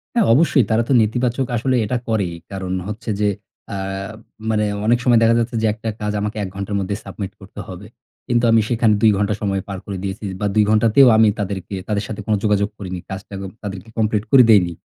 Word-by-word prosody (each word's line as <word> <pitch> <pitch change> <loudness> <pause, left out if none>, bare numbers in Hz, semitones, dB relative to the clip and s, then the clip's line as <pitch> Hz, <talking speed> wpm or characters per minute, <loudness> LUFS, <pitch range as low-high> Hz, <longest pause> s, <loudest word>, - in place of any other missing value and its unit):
হ্যাঁ, 235 - +4
অবশ্যই 140 -2 +4
তারা 110 +1 +3
তো 135 - +2
নেতিবাচক 120 +4 0
আসলে 130 +3 0
এটা 125 +4 -1
করেই। 100 -6 0 0.2
কারণ 95 -1 -5 0.2
হচ্ছে 105 +2 -6
যে, 105 -1 +2 0.4
আ - - -3 0.7
মানে 105 -1 +1 0.2
অনেক 120 +2 +4
সময় 120 -2 +5
দেখা 115 +1 +4
যাচ্ছে 115 0 -2
যে 110 - +2
একটা 110 +1 -5
কাজ 105 0 -1
আমাকে 105 +1 -3
১ 95 - -4
ঘন্টার 100 +1 -4
মধ্যে 100 +1 -2
সাবমিট 100 -3 -6
করতে - - -12
হবে। - - -9 0.4
কিন্তু 120 0 +1
আমি 115 -1 +5
সেখানে 115 -3 +3
২ 110 -1 +6
ঘন্টা 105 +1 +1
সময় 95 -2 -1
পার 100 - -5
করে 100 -2 -5
দিয়েছি 95 +2 -5 0.2
বা, 105 - -1
২ 105 - +5
ঘন্টাতেও 115 +5 +5
আমি 110 - +6
তাদেরকে 100 -1 -4
তাদের 105 -1 -1
সাথে 110 - -6
কোন 110 - +1
যোগাযোগ 105 -1 +2
করিনি। 95 -3 -6
কাজটা 95 +1 -8
ক - - -6 0.2
তাদেরকে 100 +1 -7
কমপ্লিট 110 -1 +1
করে 130 -2 +8
দেইনি। 90 -5 +4
105 Hz, 210 wpm, -20 LUFS, 100-115 Hz, 0.7 s, করে